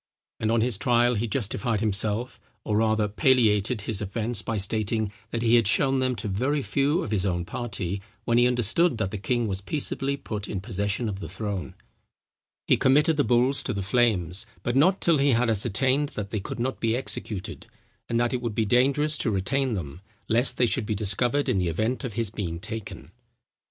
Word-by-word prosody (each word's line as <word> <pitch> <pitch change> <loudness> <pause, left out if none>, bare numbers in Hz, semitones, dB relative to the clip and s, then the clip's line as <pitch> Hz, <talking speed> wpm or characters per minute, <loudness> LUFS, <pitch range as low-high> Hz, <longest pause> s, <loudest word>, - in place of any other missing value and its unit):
And 110 - 0
on 115 -1 +2
his 115 -3 0
trial, 120 +2 +3
he 115 +1 -1
justified 115 0 -1
himself, 110 +3 0 0.2
or 105 -1 0
rather 110 -1 +2
palliated 110 -2 +2
his 105 -1 -4
offence, 105 +2 -2
by 110 +4 -3
stating, 110 +1 +1 0.2
that 115 0 -3
he 115 0 +3
had 115 -4 +3
shown 135 +5 +3
them 130 -1 0
to 110 0 -4
very 130 +9 0
few 145 +8 +1
of - - -6
his 100 -4 0
own 90 -3 -1
party, 100 -3 -4 0.2
when 120 0 +3
he 120 - +5
understood 125 - +2
that 100 -3 -2
the 105 - -5
king 120 +3 0
was 95 -1 -2
peaceably 140 +2 0
put 105 -6 -5
in 100 - -3
possession 100 +4 -2
of 100 -2 -4
the 85 - -7
throne. 100 0 -5 0.9
He - - +3
committed 150 +4 +3
the 145 - +2
bulls 125 +3 +2
to 125 - -3
the 100 -2 -3
flames, 100 -5 +1 0.2
but 120 - -1
not 180 +8 +3
till 165 -4 +3
he 140 -1 +3
had 115 0 +2
ascertained 130 +7 +1
that 105 -1 -5
they 110 - -1
could 95 - -6
not 130 +2 -2
be 115 0 +1
executed, 110 -6 -5 0.4
and 115 - +1
that 120 +1 +1
it 125 - -1
would 115 -4 -3
be 110 - +1
dangerous 140 +7 +2
to - - 0
retain 120 +6 0
them, 80 -2 -6 0.3
lest 120 +4 +1
they 125 - +4
should 120 -1 -1
be 110 - -1
discovered 120 +7 +1
in 95 - +1
the 90 -2 0
event 110 - -1
of 125 -5 -4
his 115 -2 -2
being 85 -6 -4
taken. 95 -6 -7
115 Hz, 200 wpm, -26 LUFS, 100-125 Hz, 0.9 s, he